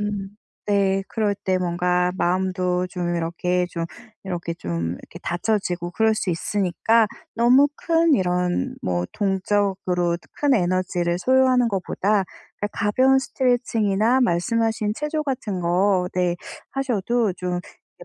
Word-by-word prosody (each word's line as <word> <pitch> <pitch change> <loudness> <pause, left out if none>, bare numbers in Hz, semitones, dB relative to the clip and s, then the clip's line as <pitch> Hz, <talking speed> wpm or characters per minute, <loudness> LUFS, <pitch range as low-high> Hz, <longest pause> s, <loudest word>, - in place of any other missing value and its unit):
음 205 -2 -3 0.4
네. 195 -1 +2
그럴 215 -3 0
때 190 -1 -1
뭔가 180 0 +1
마음도 180 0 0
좀 175 -1 -2
이렇게 180 +2 0
좀 170 -1 -3 0.4
이렇게, 175 -3 -4
좀 85 - -3
이렇게 165 - -11
다쳐지고 175 -1 -1
그럴 220 +1 +2
수 205 - -3
있으니까 205 +5 +1 0.3
너무 245 +5 +5
큰 330 0 +2
이런 180 - 0
뭐 90 -1 -1
동적으로 190 -3 0 0.2
큰 290 -2 +2
에너지를 180 -3 0
소요하는 255 +2 +4
것보다 200 +1 0 0.4
그냥 205 - -1
가벼운 255 +7 +3
스트레칭이나 245 -3 +1
말씀하신 220 +1 +1
체조 300 +4 -2
같은 225 -9 -3
거 180 +2 +2
네 180 -1 +1 0.3
하셔도 240 -4 0
좀 180 0 -3 0.4
이 - - -9
195 Hz, 270 characters per minute, -23 LUFS, 180-225 Hz, 0.4 s, 너무